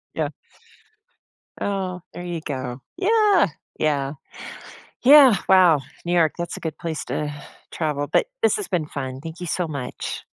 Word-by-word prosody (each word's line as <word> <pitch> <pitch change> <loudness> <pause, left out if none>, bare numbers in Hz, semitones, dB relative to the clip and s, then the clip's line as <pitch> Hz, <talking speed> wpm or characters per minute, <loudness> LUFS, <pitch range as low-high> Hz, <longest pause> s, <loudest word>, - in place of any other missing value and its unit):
Yeah. - - -1 1.3
Oh, 190 -3 -2
there 175 - -7
you 175 -2 -4
go 130 -4 -5 0.2
yeah, 420 0 +4 0.3
yeah. 140 -2 0 0.9
Yeah, 270 -3 +9
wow, 180 -6 +6 0.2
New 175 - -1
York, 165 -3 +3
that's 170 0 -4
a - - -7
good 160 -2 -5
place 160 -2 -4
to 150 -1 -3 0.4
travel, 150 -3 -2
but - - +3 0.2
this 450 - +4
has 415 - -4
been 170 -5 -1
fun, 130 -3 -5
thank 165 +2 -8
you 180 - -5
so 175 +2 -1
much. 140 -5 -5
165 Hz, 150 wpm, -23 LUFS, 150-190 Hz, 1.3 s, Yeah